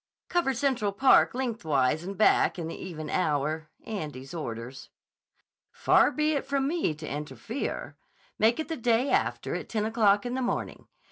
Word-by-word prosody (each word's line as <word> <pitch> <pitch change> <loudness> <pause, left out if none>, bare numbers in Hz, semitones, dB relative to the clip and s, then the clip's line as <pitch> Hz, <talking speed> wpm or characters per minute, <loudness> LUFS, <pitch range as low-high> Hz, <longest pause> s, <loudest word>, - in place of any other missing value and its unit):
"Cover 340 -7 +1
Central 240 -6 0
Park 260 +2 +5
lengthwise 160 - 0
and 195 +2 -6
back 215 - +4
in 165 -2 -4
the 165 - -6
even 155 -4 -7
hour. 155 -1 -1 0.2
Andy's 150 -9 -6
orders." 125 -4 -6 0.8
"Far - - +4
be 305 0 +1
it 285 - -1
from 275 0 0
me 310 - 0
to 155 0 -8
interfere. 150 - -5 0.4
Make 225 +5 +3
it 315 - -2
the 325 - -4
day 240 +2 +2
after - - 0
at - - -5
ten 215 -2 -1
o'clock 215 -1 +3
in 245 - -3
the 260 - -1
morning. 245 - -3
210 Hz, 160 wpm, -28 LUFS, 155-260 Hz, 0.8 s, Park